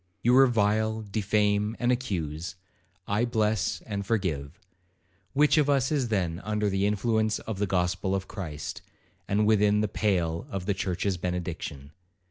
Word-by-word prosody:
You 120 Hz, -, +4 dB
revile, 110 Hz, -3 st, +3 dB
defame, 105 Hz, +1 st, +1 dB
and 120 Hz, 0 st, +1 dB
accuse,—I 95 Hz, -, -4 dB
bless 110 Hz, -2 st, 0 dB
and 100 Hz, -2 st, -3 dB
forgive; 90 Hz, -7 st, -2 dB, 0.7 s
which 150 Hz, +2 st, +4 dB
of 145 Hz, -1 st, +2 dB
us 135 Hz, -1 st, +2 dB
is 140 Hz, -5 st, +1 dB
then 90 Hz, -5 st, -1 dB
under 105 Hz, -1 st, 0 dB
the 95 Hz, +1 st, +1 dB
influence 110 Hz, +1 st, +1 dB
of 110 Hz, -4 st, -6 dB
the 105 Hz, -, +1 dB
gospel 90 Hz, +1 st, 0 dB
of 95 Hz, 0 st, -3 dB
Christ, 80 Hz, -8 st, -6 dB, 0.5 s
and 105 Hz, +2 st, +2 dB
within 105 Hz, -1 st, +4 dB
the 110 Hz, -, +1 dB
pale 90 Hz, -1 st, 0 dB
of 95 Hz, -6 st, -4 dB
the 100 Hz, -, +1 dB
church's 95 Hz, 0 st, -1 dB
benediction? 85 Hz, -5 st, -4 dB
105 Hz, 140 wpm, -27 LUFS, 90-110 Hz, 0.7 s, You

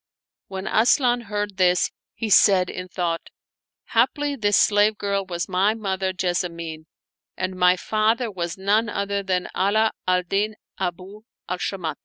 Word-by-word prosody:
When 190 Hz, 0 st, -6 dB
Asian 245 Hz, +1 st, +3 dB
heard 205 Hz, -2 st, -3 dB
this, 180 Hz, -1 st, +3 dB, 0.2 s
he 220 Hz, -2 st, -3 dB
said 190 Hz, -2 st, +5 dB
in 180 Hz, -, -6 dB
thought, 175 Hz, -2 st, -3 dB, 0.3 s
" -, -, -69 dB
Haply 280 Hz, +5 st, +2 dB
this 205 Hz, -5 st, +2 dB
slave 210 Hz, +1 st, +4 dB
girl 200 Hz, -1 st, -1 dB
was 175 Hz, -1 st, -3 dB
my 195 Hz, +4 st, +2 dB
mother 190 Hz, -3 st, -2 dB
Jessamine, 170 Hz, -3 st, -3 dB, 0.5 s
and 185 Hz, 0 st, -3 dB
my 180 Hz, 0 st, +4 dB
father 220 Hz, +4 st, 0 dB
was 175 Hz, -2 st, -4 dB
none 210 Hz, +4 st, +1 dB
other 200 Hz, 0 st, -2 dB
than 185 Hz, -2 st, -1 dB
Ala 215 Hz, +3 st, +2 dB, 0.2 s
al 180 Hz, 0 st, +2 dB
Din 205 Hz, +4 st, -1 dB, 0.2 s
Abu 185 Hz, +3 st, -5 dB, 0.3 s
al 180 Hz, 0 st, -3 dB
Shamat." 170 Hz, -7 st, -3 dB
195 Hz, 150 wpm, -23 LUFS, 180-215 Hz, 0.5 s, said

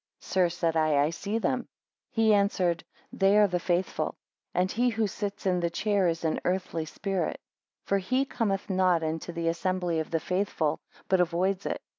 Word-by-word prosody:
Sir, 185 Hz, -2 st, +2 dB
said 165 Hz, -1 st, -1 dB
I, 155 Hz, -2 st, +3 dB
I 145 Hz, +3 st, +3 dB
see 200 Hz, +6 st, -3 dB
them. 250 Hz, +2 st, -1 dB, 0.4 s
He 225 Hz, -3 st, +3 dB
answered, 190 Hz, -4 st, +2 dB, 0.3 s
They 195 Hz, +1 st, +4 dB
are 210 Hz, -, +7 dB
the 180 Hz, -3 st, 0 dB
faithful; 180 Hz, +1 st, -1 dB, 0.4 s
and 185 Hz, +1 st, +1 dB
he 245 Hz, +3 st, +2 dB
who 225 Hz, -1 st, 0 dB
sits 205 Hz, +1 st, -4 dB
in 180 Hz, -2 st, +2 dB
the 170 Hz, -1 st, 0 dB
chair 200 Hz, +2 st, +1 dB
is 165 Hz, 0 st, -1 dB
an 160 Hz, -, +1 dB
earthly 180 Hz, -3 st, -1 dB
spirit. 190 Hz, +4 st, -2 dB
2 -, -, -13 dB, 0.5 s
For 200 Hz, -, +2 dB
he 255 Hz, +8 st, +1 dB
cometh 210 Hz, -7 st, -1 dB
not 185 Hz, -4 st, +2 dB
into 160 Hz, +2 st, -3 dB
the 170 Hz, 0 st, -3 dB
assembly 175 Hz, 0 st, 0 dB
of 160 Hz, -, -3 dB
the 165 Hz, -, 0 dB
faithful, 180 Hz, -4 st, -1 dB, 0.3 s
but 190 Hz, -1 st, +3 dB
avoids 180 Hz, +3 st, 0 dB
it. -, -, -3 dB
185 Hz, 185 wpm, -28 LUFS, 170-200 Hz, 0.5 s, are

